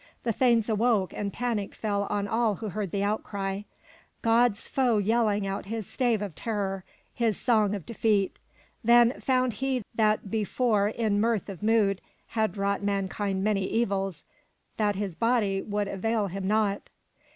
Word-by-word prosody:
The 230 Hz, -, 0 dB
thanes 235 Hz, -2 st, +3 dB
awoke 220 Hz, -3 st, +1 dB
and 200 Hz, -1 st, -3 dB
panic 230 Hz, -3 st, -2 dB
fell 200 Hz, -2 st, -1 dB
on 205 Hz, -1 st, -1 dB
all 225 Hz, 0 st, +1 dB
who 215 Hz, +2 st, -5 dB
heard 200 Hz, +1 st, -3 dB
the 200 Hz, +3 st, -1 dB
outcry, 200 Hz, -1 st, -2 dB, 0.3 s
— -, -, -30 dB
God's 230 Hz, -1 st, +3 dB
foe 250 Hz, -5 st, +2 dB
yelling 210 Hz, -1 st, +2 dB
out 195 Hz, 0 st, -4 dB
his 220 Hz, 0 st, -4 dB
stave 235 Hz, -3 st, 0 dB
of 200 Hz, -5 st, -5 dB
terror, 195 Hz, -2 st, -3 dB, 0.3 s
his 225 Hz, -4 st, 0 dB
song 215 Hz, -4 st, +2 dB
of 195 Hz, -, -7 dB
defeat. 215 Hz, -4 st, +1 dB, 0.5 s
Then 240 Hz, +2 st, +5 dB
found 255 Hz, -2 st, +1 dB
he 265 Hz, -3 st, 0 dB
that 215 Hz, -3 st, +1 dB
before 215 Hz, -1 st, +1 dB
in 215 Hz, -2 st, 0 dB
mirth 225 Hz, -3 st, 0 dB
of 190 Hz, -4 st, -8 dB
mood 210 Hz, -3 st, +2 dB, 0.3 s
had 220 Hz, -3 st, -1 dB
wrought 200 Hz, 0 st, 0 dB
mankind 200 Hz, -1 st, -1 dB
many 200 Hz, -2 st, +1 dB
evils 195 Hz, -6 st, -1 dB, 0.5 s
that 210 Hz, -2 st, +1 dB
his 195 Hz, -3 st, -3 dB
body 220 Hz, -4 st, +1 dB
would 205 Hz, -1 st, -2 dB
avail 210 Hz, +2 st, 0 dB
him 190 Hz, 0 st, -4 dB
not. 210 Hz, -1 st, 0 dB
210 Hz, 160 wpm, -27 LUFS, 200-230 Hz, 0.5 s, Then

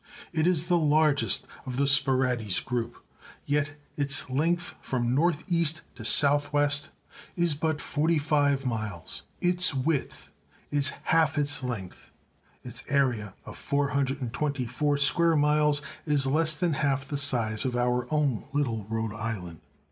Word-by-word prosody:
It 160 Hz, 0 st, +1 dB
is 170 Hz, -2 st, +1 dB
the 175 Hz, -1 st, +2 dB
largest 150 Hz, -2 st, +2 dB, 0.2 s
of 130 Hz, -2 st, -6 dB
the 140 Hz, -, +2 dB
Sporades 130 Hz, -6 st, +2 dB
group, 120 Hz, -2 st, -4 dB, 0.4 s
yet 145 Hz, 0 st, -1 dB, 0.2 s
its 140 Hz, -2 st, +2 dB
length 170 Hz, +6 st, 0 dB
from 120 Hz, -2 st, -2 dB
north 155 Hz, +2 st, +1 dB
east 170 Hz, -3 st, +1 dB
to 120 Hz, -, -11 dB
south 145 Hz, +5 st, +4 dB
west 145 Hz, 0 st, +1 dB, 0.5 s
is 175 Hz, -3 st, +1 dB
but 155 Hz, +1 st, -2 dB
forty 155 Hz, +3 st, 0 dB
five 145 Hz, -2 st, +1 dB
miles; 110 Hz, -8 st, -5 dB, 0.2 s
its 180 Hz, -3 st, +3 dB
width 140 Hz, +2 st, -2 dB, 0.4 s
is 145 Hz, -1 st, +2 dB
half 160 Hz, -1 st, +2 dB
its 145 Hz, 0 st, +3 dB
length; 115 Hz, -8 st, -7 dB, 0.5 s
its -, -, -3 dB
area 125 Hz, -8 st, 0 dB
of -, -, -10 dB
424 140 Hz, 0 st, -1 dB
square 165 Hz, +4 st, +3 dB
miles 150 Hz, 0 st, +2 dB, 0.2 s
is 145 Hz, -2 st, +3 dB
less 155 Hz, +3 st, +2 dB
than 170 Hz, +1 st, -1 dB
half 140 Hz, -1 st, -1 dB
the 145 Hz, -, -4 dB
size 115 Hz, -6 st, +2 dB
of 125 Hz, -2 st, -2 dB
our 125 Hz, +1 st, -1 dB
own 145 Hz, -7 st, 0 dB
little 115 Hz, -8 st, -2 dB
Rhode 110 Hz, -1 st, -3 dB
Island. 105 Hz, -7 st, -6 dB
145 Hz, 140 wpm, -27 LUFS, 125-150 Hz, 0.5 s, south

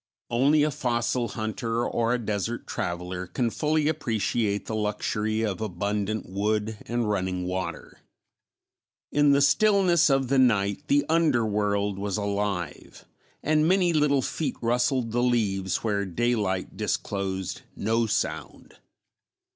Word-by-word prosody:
Only 140 Hz, +5 st, +4 dB
a 155 Hz, -, +1 dB
fossil 120 Hz, -3 st, -1 dB
hunter 115 Hz, +1 st, -2 dB
or 115 Hz, 0 st, 0 dB
a 125 Hz, -, +2 dB
desert 110 Hz, 0 st, -3 dB
traveler 90 Hz, +1 st, -4 dB
can 115 Hz, +6 st, -1 dB
fully 155 Hz, +2 st, +1 dB
appreciate 115 Hz, -7 st, -1 dB
the -, -, -5 dB
luxury 105 Hz, +1 st, -1 dB
of 100 Hz, -1 st, -3 dB
abundant 105 Hz, +1 st, -2 dB
wood 105 Hz, +2 st, -1 dB
and 120 Hz, -1 st, -1 dB
running 95 Hz, -3 st, -1 dB
water. 95 Hz, +1 st, -5 dB, 1.1 s
In 145 Hz, 0 st, +4 dB
the 140 Hz, -, +4 dB
stillness 180 Hz, 0 st, +4 dB
of 135 Hz, -1 st, +2 dB
the 135 Hz, +1 st, +2 dB
night 110 Hz, +2 st, +2 dB
the 145 Hz, 0 st, +3 dB
underworld 105 Hz, -10 st, +1 dB
was 100 Hz, 0 st, -2 dB
alive 100 Hz, -3 st, -3 dB, 0.4 s
and 155 Hz, +1 st, +3 dB
many 180 Hz, -1 st, +3 dB
little 145 Hz, -3 st, +3 dB
feet 145 Hz, -5 st, -2 dB
rustled 120 Hz, 0 st, +1 dB
the 120 Hz, +2 st, +1 dB
leaves 100 Hz, -7 st, 0 dB
where 105 Hz, -3 st, 0 dB
daylight 100 Hz, -1 st, -1 dB
disclosed 95 Hz, -2 st, -3 dB
no 115 Hz, +2 st, 0 dB
sound. 105 Hz, -2 st, -3 dB
110 Hz, 125 wpm, -26 LUFS, 100-135 Hz, 1.1 s, Only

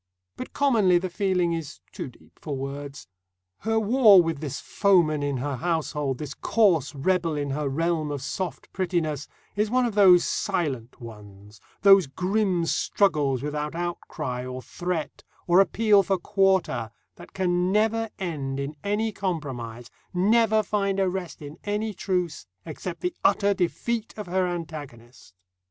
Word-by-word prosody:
But -, -, -7 dB
commonly 220 Hz, -11 st, +3 dB
the 180 Hz, +1 st, -3 dB
feeling 180 Hz, -3 st, +1 dB
is 165 Hz, -3 st, -5 dB
too -, -, -6 dB
deep 125 Hz, -, -22 dB
for 145 Hz, -3 st, -4 dB
words. 140 Hz, -1 st, -6 dB, 0.5 s
Her 225 Hz, 0 st, +1 dB
war 220 Hz, -2 st, +6 dB
with 165 Hz, -4 st, 0 dB
this 145 Hz, -3 st, -4 dB
foeman 175 Hz, -7 st, +2 dB
in 140 Hz, -2 st, -1 dB
her 135 Hz, +1 st, -3 dB
household, 150 Hz, -3 st, -1 dB
this 150 Hz, 0 st, -6 dB
coarse 175 Hz, -, +2 dB
rebel 170 Hz, +2 st, 0 dB
in 145 Hz, -1 st, -2 dB
her 145 Hz, 0 st, -1 dB
realm 160 Hz, +1 st, 0 dB
of 145 Hz, -2 st, -4 dB
soft 180 Hz, +4 st, -5 dB
prettiness, 165 Hz, -6 st, -1 dB, 0.3 s
is 210 Hz, +1 st, +1 dB
one 250 Hz, +2 st, +2 dB
of 235 Hz, -, -2 dB
those 190 Hz, -4 st, +6 dB
silent 140 Hz, -, -2 dB
ones, 105 Hz, -3 st, -12 dB, 0.2 s
those 195 Hz, -5 st, +7 dB
grim 185 Hz, +3 st, 0 dB
struggles 150 Hz, -9 st, +1 dB
without 150 Hz, +1 st, -3 dB
outcry 160 Hz, -7 st, -4 dB
or 130 Hz, 0 st, -6 dB
threat 175 Hz, -3 st, -4 dB, 0.2 s
or 175 Hz, +1 st, +5 dB
appeal 205 Hz, +1 st, +4 dB
for 195 Hz, 0 st, 0 dB
quarter 190 Hz, -, +1 dB, 0.3 s
that -, -, -13 dB
can 180 Hz, -1 st, +1 dB
never 225 Hz, +2 st, +1 dB
end 145 Hz, -8 st, -3 dB
in 140 Hz, +2 st, -4 dB
any 210 Hz, +2 st, 0 dB
compromise, 130 Hz, -, -5 dB, 0.2 s
never 220 Hz, +3 st, +3 dB
find 200 Hz, -1 st, -1 dB
a 190 Hz, -, +2 dB
rest 180 Hz, -4 st, -5 dB
in 145 Hz, +2 st, -9 dB
any 210 Hz, +1 st, -2 dB
truce, 180 Hz, -, -2 dB, 0.2 s
except 170 Hz, +2 st, -6 dB
the 360 Hz, -1 st, -1 dB
utter 200 Hz, 0 st, +3 dB
defeat 215 Hz, +5 st, -2 dB
of 210 Hz, -, -5 dB
her 185 Hz, +1 st, 0 dB
antagonist. 145 Hz, -, -8 dB
175 Hz, 150 wpm, -25 LUFS, 145-195 Hz, 0.5 s, those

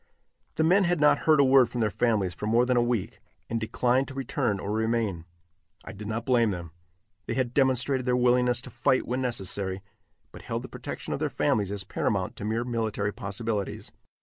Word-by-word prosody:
The 160 Hz, -, +1 dB
men 190 Hz, +4 st, +4 dB
had 175 Hz, -1 st, +1 dB
not 150 Hz, 0 st, +5 dB
heard 155 Hz, -2 st, +6 dB
a -, -, +7 dB
word 130 Hz, -2 st, +5 dB
from 120 Hz, -, -4 dB
their 110 Hz, -2 st, +1 dB
families 105 Hz, -7 st, +1 dB
for 105 Hz, -, -5 dB
more 115 Hz, +3 st, +3 dB
than 125 Hz, 0 st, +1 dB
a 120 Hz, -, +4 dB
week, 120 Hz, -5 st, -2 dB, 0.3 s
and 115 Hz, -, 0 dB
declined 125 Hz, +4 st, +1 dB
to 135 Hz, -, -9 dB
return 125 Hz, -5 st, -1 dB
or 100 Hz, -, -4 dB
remain. 110 Hz, -6 st, -1 dB, 0.6 s
I -, -, -7 dB
did 100 Hz, +2 st, -8 dB
not 110 Hz, +2 st, -3 dB
blame 120 Hz, -3 st, +3 dB
them. 85 Hz, -4 st, -5 dB, 0.6 s
They -, -, -2 dB
had 125 Hz, -2 st, -1 dB
demonstrated 130 Hz, -1 st, +1 dB
their 125 Hz, 0 st, +3 dB
willingness 125 Hz, -1 st, +2 dB
to -, -, -9 dB
fight 130 Hz, -, +1 dB
when 125 Hz, +2 st, -1 dB
necessary, 95 Hz, -5 st, -3 dB, 0.5 s
but -, -, -11 dB
held -, -, -4 dB
the -, -, -8 dB
protection -, -, -6 dB
of -, -, -3 dB
their -, -, 0 dB
families 100 Hz, -3 st, 0 dB
as 100 Hz, -1 st, -1 dB
paramount 95 Hz, -1 st, -2 dB
to 105 Hz, -, -5 dB
mere 110 Hz, +2 st, 0 dB
military 110 Hz, -4 st, -2 dB
possibilities. 100 Hz, 0 st, -4 dB
115 Hz, 200 wpm, -27 LUFS, 105-125 Hz, 0.6 s, a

